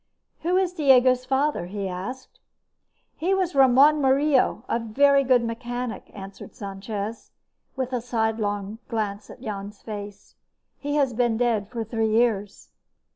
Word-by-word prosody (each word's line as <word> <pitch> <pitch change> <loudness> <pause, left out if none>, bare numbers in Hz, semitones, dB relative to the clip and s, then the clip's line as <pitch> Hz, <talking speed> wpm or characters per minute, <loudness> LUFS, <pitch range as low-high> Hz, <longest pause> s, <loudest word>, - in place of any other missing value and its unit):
"Who 355 +3 +1
is 370 -2 +1
Diego's 255 -5 +4
father?" 270 -7 0
he 200 +1 -4
asked. 195 +9 -7 0.8
"He 370 +4 +1
was 370 -3 0
Ramón 275 +3 +6
Murillo, 270 -3 +2
a 230 - 0
very 275 +5 +3
good 255 -2 +3
mechanic," 240 +1 -5
answered 195 -1 -10
Sanchez, 200 +2 -6 0.5
with 260 -1 -3
a 245 - 0
sliding 225 -2 -1
sidelong 205 0 -3
glance 210 -3 -3
at 250 - -12
Jan's 205 -2 -6
face. 205 -2 -8 0.5
"He 290 0 -3
has 275 -4 +2
been 235 -1 +1
dead 225 -4 0
for 235 -2 -4
three 225 0 -1
years." 215 -3 0
235 Hz, 140 wpm, -25 LUFS, 210-265 Hz, 0.8 s, Ramón